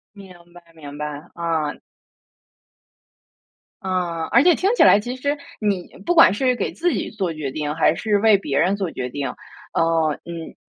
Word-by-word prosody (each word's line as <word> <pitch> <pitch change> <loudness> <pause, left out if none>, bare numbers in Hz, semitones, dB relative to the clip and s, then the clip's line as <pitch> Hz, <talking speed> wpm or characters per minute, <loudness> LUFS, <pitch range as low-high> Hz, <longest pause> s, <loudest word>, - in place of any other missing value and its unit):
明 195 -2 -12 0.2
白， 175 0 -15
明 145 -2 -10
白， 150 0 -4 0.3
啊。 160 -3 -2 2.1
嗯， 175 -3 -2
而 245 - +5
且 350 -1 +5
听 400 +6 +1
起 - - +3
来 205 - +7
其 245 +4 -5
实 285 +3 -1 0.2
你 200 -4 -1 0.2
不 350 - +2
管 330 - +7
是 255 +3 +1
给 200 - -2
自 350 +1 0
己 - - -3
做 190 -6 -3
决 150 -3 -4
定， 150 +1 -3
还 165 - +3
是 210 -2 0
为 215 -1 +5
别 140 -7 -2
人 185 +6 +2
做 190 -4 -3
决 125 0 -4
定。 140 +1 -3 0.4
呃， 165 -1 +2
嗯， 170 -1 -8
180 Hz, 185 characters per minute, -21 LUFS, 160-220 Hz, 2.1 s, 来